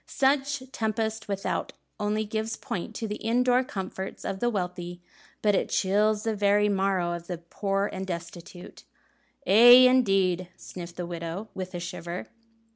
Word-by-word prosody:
"Such 275 Hz, 0 st, +1 dB
tempest 220 Hz, -1 st, -2 dB
without 195 Hz, -1 st, -2 dB, 0.3 s
only 210 Hz, +1 st, 0 dB
gives 220 Hz, +1 st, -3 dB
point 195 Hz, +4 st, -5 dB
to 225 Hz, -, -3 dB
the 210 Hz, -, -4 dB
indoor 250 Hz, +2 st, +2 dB
comforts 190 Hz, -4 st, -6 dB
of 190 Hz, -, -3 dB
the 240 Hz, -, +1 dB
wealthy; 180 Hz, -4 st, -4 dB, 0.4 s
but 210 Hz, -1 st, +4 dB
it -, -, 0 dB
chills 210 Hz, +2 st, +2 dB
the 225 Hz, -1 st, -1 dB
very 205 Hz, 0 st, +3 dB
marrow 190 Hz, -3 st, +1 dB
of 170 Hz, 0 st, -7 dB
the 180 Hz, -, -4 dB
poor 195 Hz, +4 st, -2 dB
and 190 Hz, -1 st, -5 dB
destitute." 175 Hz, 0 st, -8 dB, 0.6 s
"Aye, 245 Hz, +5 st, +9 dB
indeed," 195 Hz, -8 st, +2 dB
sniffed 175 Hz, -1 st, -9 dB
the 175 Hz, -, -4 dB
widow, 170 Hz, +4 st, -5 dB
with 185 Hz, -1 st, -6 dB
a -, -, -3 dB
shiver. 175 Hz, +2 st, -6 dB
195 Hz, 150 wpm, -27 LUFS, 180-220 Hz, 0.6 s, Aye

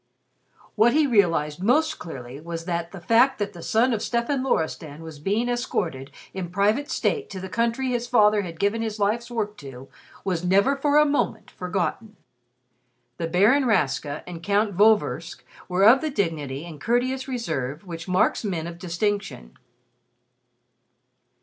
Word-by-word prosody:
What 225 Hz, +2 st, +4 dB
he 305 Hz, +1 st, +4 dB
realized 170 Hz, -, +2 dB
most 310 Hz, +9 st, +2 dB
clearly 135 Hz, -4 st, -8 dB
was 165 Hz, 0 st, -6 dB
that 170 Hz, -1 st, -3 dB
the 195 Hz, -, -8 dB
fact 235 Hz, +9 st, +3 dB
that 205 Hz, -1 st, -3 dB
the 170 Hz, -, -10 dB
son 235 Hz, +7 st, +2 dB
of 215 Hz, -, -1 dB
Stefan 240 Hz, +3 st, -1 dB
Loristan 160 Hz, -, -2 dB
was 160 Hz, -2 st, -9 dB
being 205 Hz, +10 st, 0 dB
escorted 170 Hz, -, -2 dB, 0.2 s
in 185 Hz, -2 st, -4 dB
private 210 Hz, +9 st, +1 dB
state 425 Hz, -, -1 dB
to 190 Hz, -, -6 dB
the 190 Hz, -, -6 dB
country 235 Hz, +5 st, 0 dB
his 240 Hz, -1 st, -2 dB
father 215 Hz, -4 st, +4 dB
had 170 Hz, -4 st, -8 dB
given 205 Hz, +3 st, +1 dB
his 220 Hz, -1 st, -3 dB
life's 215 Hz, +4 st, 0 dB
work 210 Hz, -3 st, -3 dB
to, 135 Hz, -3 st, -10 dB, 0.3 s
was 180 Hz, -3 st, -2 dB
never 200 Hz, +9 st, +3 dB
for 285 Hz, +1 st, +2 dB
a 300 Hz, -, +6 dB
moment 290 Hz, 0 st, -1 dB
forgotten. 195 Hz, +4 st, -3 dB, 1.0 s
The 165 Hz, -, -2 dB
Baron 210 Hz, +11 st, +4 dB
Rastka 145 Hz, -, 0 dB
and 170 Hz, -2 st, -8 dB
Count 205 Hz, +1 st, +1 dB
Vorversk 210 Hz, +2 st, +2 dB, 0.3 s
were 180 Hz, +2 st, +2 dB
of 255 Hz, +4 st, +7 dB
the 315 Hz, -, -1 dB
dignity 160 Hz, -, -2 dB
and 160 Hz, -4 st, -10 dB
courteous 255 Hz, +3 st, 0 dB
reserve 160 Hz, -, -3 dB
which 165 Hz, -1 st, -7 dB
marks 185 Hz, +5 st, +2 dB
men 175 Hz, -6 st, -2 dB
of 170 Hz, 0 st, -8 dB
distinction. 195 Hz, -, -3 dB
200 Hz, 155 wpm, -24 LUFS, 165-235 Hz, 1.0 s, of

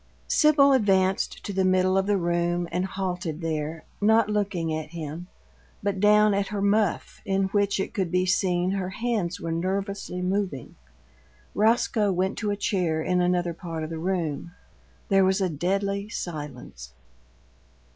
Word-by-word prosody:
Sibyl 290 Hz, -3 st, +5 dB
advanced 195 Hz, -5 st, +1 dB
to 200 Hz, -, -4 dB
the 190 Hz, 0 st, +1 dB
middle 185 Hz, 0 st, +3 dB
of 195 Hz, 0 st, +1 dB
the 205 Hz, -1 st, +2 dB
room 175 Hz, 0 st, 0 dB
and 180 Hz, +2 st, 0 dB
halted 180 Hz, -4 st, -4 dB
there, 160 Hz, 0 st, -3 dB, 0.2 s
not 220 Hz, +1 st, +4 dB
looking 195 Hz, -6 st, -1 dB
at 155 Hz, -1 st, -4 dB
him, 165 Hz, +1 st, -6 dB, 0.6 s
but 200 Hz, -1 st, -1 dB
down 210 Hz, +1 st, +5 dB
at 200 Hz, 0 st, 0 dB
her 210 Hz, -, -4 dB
muff, 200 Hz, -1 st, 0 dB
in 195 Hz, 0 st, 0 dB
which, 200 Hz, 0 st, +1 dB
it 195 Hz, -, -3 dB
could 190 Hz, -5 st, -1 dB
be 180 Hz, 0 st, +2 dB
seen, 180 Hz, -1 st, +1 dB
her 190 Hz, -2 st, -2 dB
hands 205 Hz, -4 st, -2 dB
were 165 Hz, -, -4 dB
nervously 190 Hz, +2 st, -3 dB
moving. 185 Hz, -, -2 dB, 0.8 s
Roscoe 215 Hz, -1 st, +2 dB
went 185 Hz, +2 st, 0 dB
to 210 Hz, -, -1 dB
a 205 Hz, -, -1 dB
chair 175 Hz, -6 st, 0 dB
in 180 Hz, +1 st, +1 dB
another 175 Hz, -1 st, +1 dB
part 165 Hz, -1 st, -6 dB
of 155 Hz, -, -5 dB
the 165 Hz, -, -4 dB
room. 170 Hz, -2 st, -2 dB, 0.6 s
There 195 Hz, -1 st, +5 dB
was 190 Hz, +1 st, +2 dB
a 190 Hz, -2 st, +1 dB
deadly 195 Hz, +5 st, -1 dB
silence. 135 Hz, -, -7 dB
185 Hz, 155 wpm, -26 LUFS, 170-200 Hz, 0.8 s, Sibyl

